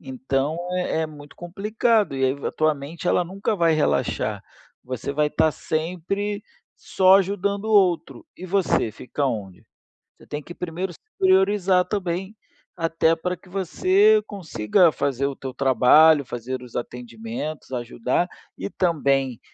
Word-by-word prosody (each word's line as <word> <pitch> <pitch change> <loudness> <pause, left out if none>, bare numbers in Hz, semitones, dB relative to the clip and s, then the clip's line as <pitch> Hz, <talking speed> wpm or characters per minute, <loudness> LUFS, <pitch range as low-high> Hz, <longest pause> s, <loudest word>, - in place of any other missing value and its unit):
Então, 135 +4 -2 0.2
é 180 -3 -1
é 160 - 0
muito 145 -1 -13
complicado, 210 +2 0
e 135 - +1
aí 130 - +3
va 140 - -4
a - - -7
tua 155 0 +2
mente 155 +5 -6
ela 180 - +2
nunca 195 +4 -2
vai 165 -2 +3
relaxar. 75 - 0 0.4
Você 130 +2 -4
vai 150 +1 +2
estar 155 +1 +2
sempre 180 +7 -3 0.3
só 190 0 +4
ajudando 200 +1 -1
o 220 - -2
outro. 185 - +2
E 185 - -9
você, 185 - +1
fica 135 +6 -6
aonde? 100 -9 -3 0.5
Você - - -18
tem 150 0 -5
que 175 - -10
primeiro 180 +2 -4
se - - -18 0.2
priorizar 190 -1 +3
também, 190 +1 -3 0.4
até 165 -1 +1
pra 180 +2 -3
que - - -22
você 375 - +3
consiga 170 - +2
fazer 140 -2 -1
o 140 - -4
teu 130 -1 -7
trabalho, 140 +3 +5
fazer 125 +1 -5
os 125 -2 -13
atendimentos, 120 +5 -6
ajudar, 120 +6 -1 0.3
e - - -4
também 140 - 0
165 Hz, 150 wpm, -23 LUFS, 135-190 Hz, 0.5 s, trabalho